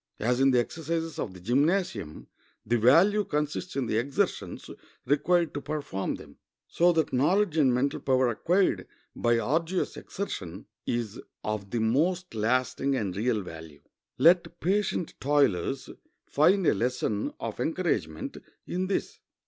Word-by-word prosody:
As 125 +2 +1
in 135 0 +5
the 125 - +3
exercises 165 +5 -3
of 100 - -3
the - - -10
gymnasium 145 - 0 0.4
the 120 +2 +1
value 175 - +5
consists 150 +2 -3
in 135 -2 0
the 110 - 0
exertions 135 +3 -2 0.4
required 165 +4 +2
to 145 - -4
perform 145 -10 -3
them, - - -13 0.3
so 175 +1 +3
that 160 -3 0
knowledge 170 +7 +2
and 145 -5 +4
mental 130 +3 0
power 130 -2 +2
acquired 180 - +1 0.3
by 120 0 +2
arduous 160 - 0
exertion 95 - -6 0.2
is 115 -3 -2 0.2
of 105 -2 -3
the 120 - -1
most 165 +11 +1
lasting 130 +5 0
and 100 -7 -2
real 110 0 0
value. 80 -4 -11 0.3
Let 170 +4 +4
patient 190 -1 0
toilers 135 -3 +1 0.4
find 180 +6 +3
a - - +5
lesson 110 -1 -1
of 115 0 -5
encouragement 120 - -2 0.3
in 185 +1 -2
this. 195 - -2
135 Hz, 140 wpm, -28 LUFS, 115-170 Hz, 0.4 s, in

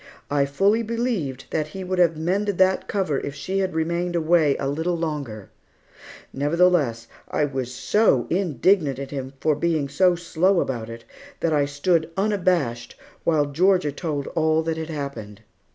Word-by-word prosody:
I 140 -1 +2
fully 200 +10 +2
believed 225 - -2
that 155 -1 -1
He 190 +5 -7
would 185 0 -2
have 165 -3 +3
mended 190 +4 -1
that 190 0 +3
cover 185 -9 0
if 140 - -6
she 190 +5 -2
had 190 -3 -1
remained 170 +2 -1
away 160 -3 +3
a 135 - -2
little 160 +5 -1
longer; 140 - -4 0.8
nevertheless, 145 -5 +2 0.2
I 150 - +1
was 130 -3 -4
so 130 - +2
indignant 170 -4 +2
at 135 0 -6
Him 135 -1 -5
for 155 - +2
being 155 -2 0
so 180 +5 +3
slow 175 +2 +1
about 115 -7 -3
it, 115 0 -9 0.4
that 165 -2 +1
I 145 -1 +3
stood 160 +3 0
unabashed 180 - 0 0.3
while 155 -3 +3
Georgia 175 +2 +2
told 145 -2 -3
all 160 0 +1
that 160 0 -2
had 160 0 -5
happened. 120 -9 -6
160 Hz, 160 wpm, -23 LUFS, 140-180 Hz, 0.8 s, have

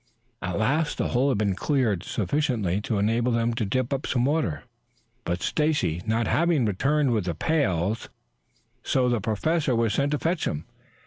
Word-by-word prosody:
At 90 -1 -3
last 150 +9 +1
the - - -1
hole 130 +3 +2
had 130 - +1
been 100 -2 +1
cleared 115 - +1
sufficiently 105 - -1
to 110 0 -2
enable 115 +4 +1
them 115 0 +1
to 115 -1 -1
dip 130 +6 -1
up 135 - -2
some 125 -1 +1
water, 150 +2 0 0.6
but 85 +1 -2
Stacy 145 - 0
not 110 +1 +1
having 160 -1 +2
returned 135 +7 +1
with 110 -6 0
the 85 -3 -2
pails, 105 - 0 0.7
the 125 -3 +1
Professor 135 - 0
was 115 -2 +1
sent 140 +4 +1
to - - +2
fetch 165 +3 -1
him. 75 +2 -3
120 Hz, 170 wpm, -25 LUFS, 100-145 Hz, 0.7 s, hole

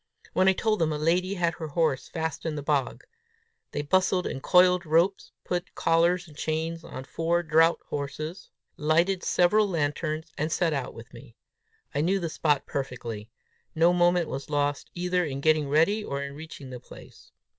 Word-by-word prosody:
When 185 +1 +3
I 190 - +6
told 215 +2 0
them 160 -2 +1
a 150 - -1
lady 180 +5 +1
had 170 -2 +1
her 160 - -4
horse 150 -2 0
fast 160 -2 -3
in 160 -2 -2
the 145 - -5
bog, 140 -4 -1 0.7
they 145 - -3
bustled 185 +3 +2
and 135 - -4
coiled 180 +2 +5
ropes, 170 +4 +1
put 180 0 -3
collars 170 +2 +2
and 150 - -15
chains 160 +2 -2
on 130 - -8
four 170 +5 0
draught 165 +1 +3
horses, 155 +5 -5 0.3
lighted 170 +5 +2
several 210 +4 +3
lanterns, 155 -1 -2
and 155 +2 -1
set 165 -2 +1
out 135 -3 -3
with 115 +2 -12
me. 115 -1 -13 0.6
I 145 - 0
knew 190 +5 +2
the 170 -3 -3
spot 150 -2 +1
perfectly. 120 -6 -5 0.5
No 165 +2 +4
moment 175 -1 +3
was 135 +2 -6
lost 145 -1 -1
either 180 0 0
in 135 -4 -3
getting 155 -1 +2
ready, 165 +9 +3
or 140 -6 -3
in 140 0 -6
reaching 145 -3 -10
the 125 - -7
place. - - -15
160 Hz, 175 wpm, -27 LUFS, 145-175 Hz, 0.7 s, I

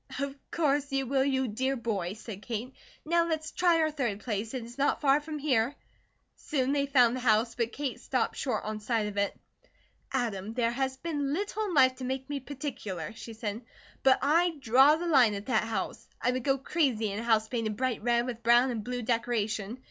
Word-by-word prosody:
"Of 280 -1 -2 0.2
course 290 -3 +1
you 270 0 0
will, 265 +1 +2
you 265 -1 +1
dear 260 +5 -1
boy," 205 -7 -2
said 210 -2 -9
Kate. 235 +3 -5 0.3
"Now 335 +1 +2
let's 315 -1 -2
try 345 -2 +3
our 310 0 +2
third 240 -9 -2
place; 220 +1 -3
it 250 - -3
is 240 +3 -11
not 280 - +2
far 280 +1 +4
from 305 0 -6
here." 270 -3 +1 0.6
Soon 270 -4 -1
they 280 -1 +1
found 250 -3 +4
the - - -3
house, 230 -1 +2
but 235 -1 -1
Kate 275 -3 -4
stopped 255 -4 -1
short 245 -6 -2
on 215 0 -4
sight 220 0 0
of 205 -1 -5
it. 200 0 0 0.7
"Adam, 225 -5 -2
there 235 -2 +1
has 265 +1 -2
been 290 -2 -2
little 415 +5 -2
in 370 -5 -3
life 260 -2 +5
to 260 - -7
make 265 +1 -3
me 285 - -2
particular," 250 - -5
she 225 +1 -9
said, 220 0 -4 0.4
"but 265 -1 +5
I 330 +4 +3
draw 265 +4 +6
the 340 +2 -4
line 255 -10 +5
at 200 +1 -6
that 225 -4 +1
house. 220 -4 -4
I 250 - +1
would 255 -1 -2
go 270 0 +2
crazy 260 -7 0
in 200 - -3
a - - -4
house 220 -2 +2
painted 220 -3 -2
bright 255 -2 -1
red 235 +1 +2
with 240 -2 -5
brown 240 +2 +5
and 225 -3 -3
blue 245 +1 -4
decoration. 225 -2 -1
250 Hz, 210 wpm, -29 LUFS, 225-280 Hz, 0.7 s, draw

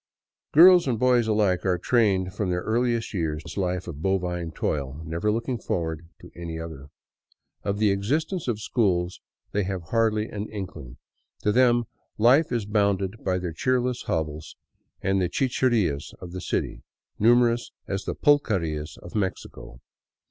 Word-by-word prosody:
Girls 175 +1 +8
and 120 -3 +1
boys 125 -1 +3
alike 105 -4 +2
are 95 -2 +1
trained 95 -2 +2
from 100 -2 -2
their 90 0 -1
earliest 115 0 0
years 80 -4 -2
to - - -12
this - - -9
life 90 -1 -2
of 75 -4 -7
bovine 90 -3 -1
toil, 70 -3 -3
never 85 +7 -1
looking 115 +2 -2
forward 80 -4 -3
to - - -13
any 85 -1 -6
other. 80 -4 -8 0.7
Of 100 0 -2
the 105 -1 +3
existence 150 - -1
of 115 -4 -1
schools 95 -6 0 0.3
they 105 - 0
have 95 -4 -5
hardly 110 -2 +1
an 105 -1 -5
inkling. 85 - -7 0.5
To 105 - +3
them 120 0 +4 0.3
life 125 +8 +4
is 120 -4 -1
bounded 100 -1 0
by 95 -1 +1
their 90 -2 -4
cheerless 125 +4 0
hovels 80 -1 -3 0.5
and 95 0 +2
the 90 - 0
chicherias 115 - 0
of 90 - -9
the 95 +1 -6
city, - - -2 0.4
numerous 120 +1 +3 0.2
as 100 0 -3
the - - -3
pulquerias 85 - +1
of 85 - -10
Mexico. 75 - -4
100 Hz, 155 wpm, -25 LUFS, 85-115 Hz, 0.7 s, Girls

